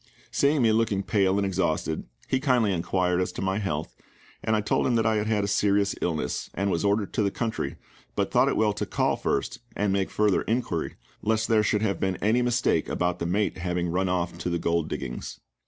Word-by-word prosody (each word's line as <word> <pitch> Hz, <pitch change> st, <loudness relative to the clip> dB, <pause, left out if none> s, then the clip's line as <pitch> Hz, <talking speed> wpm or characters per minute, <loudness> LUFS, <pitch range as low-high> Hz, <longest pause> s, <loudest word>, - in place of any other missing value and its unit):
Seeing 140 Hz, -1 st, +2 dB
me 115 Hz, -, +5 dB
looking 110 Hz, -3 st, +1 dB
pale 95 Hz, -3 st, +2 dB
and 100 Hz, -, +1 dB
exhausted, 85 Hz, -4 st, -1 dB, 0.2 s
he 130 Hz, -, +1 dB
kindly 125 Hz, -7 st, +2 dB
inquired 90 Hz, +1 st, +1 dB
as 90 Hz, -, -1 dB
to -, -, -5 dB
my 95 Hz, +1 st, 0 dB
health, 80 Hz, -6 st, -3 dB, 0.5 s
and 110 Hz, -, +2 dB
I 105 Hz, -, +1 dB
told 105 Hz, -, +1 dB
him 125 Hz, -, +2 dB
that 115 Hz, -1 st, +2 dB
I 110 Hz, -1 st, +3 dB
had 105 Hz, 0 st, -1 dB
had 105 Hz, -2 st, +1 dB
a -, -, -1 dB
serious 100 Hz, 0 st, +2 dB
illness, 80 Hz, -3 st, -2 dB
and 100 Hz, +1 st, 0 dB
was 85 Hz, -, 0 dB
ordered 100 Hz, 0 st, +1 dB
to -, -, +1 dB
the 100 Hz, -, +2 dB
country, 110 Hz, +2 st, -3 dB, 0.4 s
but -, -, 0 dB
thought -, -, +4 dB
it -, -, +1 dB
well 105 Hz, -1 st, +3 dB
to 105 Hz, -, -3 dB
call -, -, +1 dB
first, -, -, -2 dB, 0.2 s
and 100 Hz, -1 st, +1 dB
make 100 Hz, -1 st, 0 dB
further 105 Hz, -4 st, +2 dB
inquiry, 110 Hz, -8 st, -2 dB, 0.3 s
lest 110 Hz, +1 st, +1 dB
there 110 Hz, -2 st, +5 dB
should 105 Hz, 0 st, +1 dB
have 100 Hz, -5 st, 0 dB
been 95 Hz, -1 st, 0 dB
any 110 Hz, +7 st, +2 dB
mistake 120 Hz, 0 st, +1 dB
about 90 Hz, 0 st, -1 dB
the 85 Hz, -, -2 dB
mate 100 Hz, +2 st, 0 dB
having 90 Hz, 0 st, -1 dB
run 90 Hz, +2 st, 0 dB
off 90 Hz, -2 st, -1 dB
to 90 Hz, -, -2 dB
the 85 Hz, -, 0 dB
gold 85 Hz, -1 st, 0 dB
diggings. 65 Hz, -3 st, -5 dB
100 Hz, 220 wpm, -26 LUFS, 90-110 Hz, 0.5 s, me